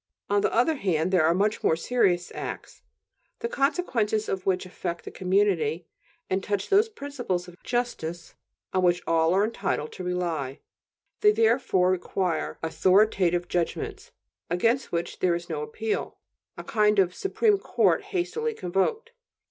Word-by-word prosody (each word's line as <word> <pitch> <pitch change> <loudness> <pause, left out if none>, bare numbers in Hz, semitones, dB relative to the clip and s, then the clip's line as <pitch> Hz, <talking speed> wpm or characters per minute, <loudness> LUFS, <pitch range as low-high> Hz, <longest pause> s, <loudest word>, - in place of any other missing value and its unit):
On 205 0 +3
the - - +1
other 250 +7 +2
hand, 180 -5 0
there 180 -4 +4
are 165 - +3
much 205 +3 0
more 160 - +3
serious 180 -2 +1
acts, - - -7 0.6
the 465 - -3
consequences 260 - 0
of 190 0 -3
which 185 -1 +1
affect 175 -1 -5
the - - -7
community 180 -4 +1 0.4
and 190 0 -1
touch 205 -1 -2
those 415 +3 +4
principles 275 - -4
of 180 - -11
justice 175 -9 -3 0.4
on 185 - +2
which 175 0 +2
all 165 0 +3
are 195 - +4
entitled 195 -8 -2
to 185 - -8
rely; 170 -7 -2 0.6
they 420 - +6
therefore 225 - +3
require 180 -2 -1
"authoritative 180 0 +3
judgments" 415 - -3 0.4
against 230 +9 +1
which 170 0 -3
there 175 -2 +2
is 175 0 -6
no 155 -2 -3
appeal; 210 +9 -3 0.4
a - - -6
kind 210 -1 +2
of 185 -2 +3
Supreme 410 - +1
Court 410 - +1
hastily 435 +4 -2
convoked. 195 - -1
190 Hz, 150 wpm, -26 LUFS, 175-245 Hz, 0.6 s, they